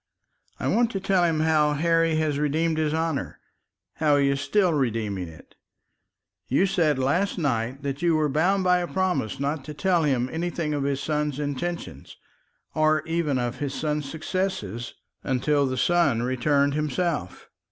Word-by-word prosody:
"I - - -2
want 235 0 +2
to 195 - -1
tell 190 -2 +2
him 160 -2 +1
how 155 -2 +3
Harry 165 +1 +2
has 155 -2 0
redeemed 155 +2 0
his 155 -1 +1
honour, 160 -2 -2 0.6
how 150 -2 +3
he 140 -1 +3
is 140 0 -1
still 185 +3 +2
redeeming 110 - -1
it. 80 -1 -15 0.9
You 140 +9 +3
said 165 -7 +1
last 145 +12 0
night 130 -3 -1
that 140 0 -3
you 170 -2 +3
were 155 -1 +2
bound 180 +7 +1
by 180 0 +4
a 175 - -2
promise 185 - -1
not 140 +1 -2
to 150 - -7
tell 180 +2 +2
him 130 -5 +1
anything 165 -2 -2
of 140 -2 -1
his 140 -1 -1
son's 150 -1 -1
intention, 150 +4 -4 0.7
or 155 -1 +2
even 165 -4 0
of 120 0 -3
his 140 -2 -3
son's 150 -2 -2
success 155 - -3 0.3
until 140 +2 +1
the 130 0 -3
son 140 -6 +2
returned 140 +3 +1
himself. 150 - -2
150 Hz, 165 wpm, -25 LUFS, 135-165 Hz, 0.9 s, by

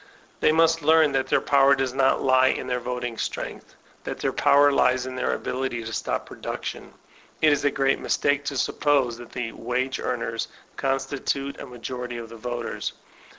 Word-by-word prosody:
They - - +4
must 165 +1 +3
learn 160 0 +5
that 135 -1 0
their - - +3
power 140 -1 +5
does 130 -2 -1
not 135 0 +2
lie 130 0 +5
in - - 0
their 125 -1 -1
voting 120 -1 -4
strength, - - -5 0.3
that - - -5
their - - -1
power 145 0 +5
lies 130 -2 +3
in 130 - -5
their 130 - 0
ability 125 -2 -3
to 110 0 -6
stop - - -2
production. - - -6 0.4
It 155 -1 +5
is 145 - -1
a 145 - +4
great 135 0 +1
mistake 145 0 +1
to 140 -1 -2
suppose 130 -3 +1
that 120 -1 -11
the 120 -2 -3
wage 125 +3 -2
earners - - -2 0.3
constitute 135 +1 -2
a - - -7
majority 125 0 -6
of 115 -1 -7
the 115 - -10
voters. 120 +1 -4
130 Hz, 180 wpm, -25 LUFS, 125-140 Hz, 0.4 s, learn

